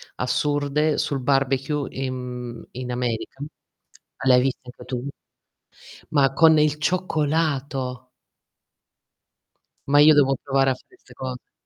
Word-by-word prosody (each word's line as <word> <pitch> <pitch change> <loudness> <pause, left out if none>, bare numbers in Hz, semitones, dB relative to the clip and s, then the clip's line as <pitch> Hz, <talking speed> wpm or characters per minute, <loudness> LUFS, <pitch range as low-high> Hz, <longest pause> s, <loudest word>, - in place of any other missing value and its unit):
assurde, 145 +3 0
sul 135 -2 -1
barbecue 135 +2 0
in 130 -1 -3
mhmm, 125 -2 -7
in 125 0 -6
America. 125 +2 -3 0.8
L'hai 125 -1 +6
viste 130 0 -1
anche 125 0 -12
tu? 125 +1 -4 1.0
Ma 135 -4 +3
con 160 +1 +6
il 150 0 +2
cioccolato. 145 -6 -1 1.8
Ma 145 +1 +5
io 155 +1 +8
devo 135 -2 +4
provare 135 -1 +2
a - - +1
fare 370 - -22
'ste - - -19
cose. 130 -1 -7
135 Hz, 120 wpm, -23 LUFS, 125-150 Hz, 1.8 s, io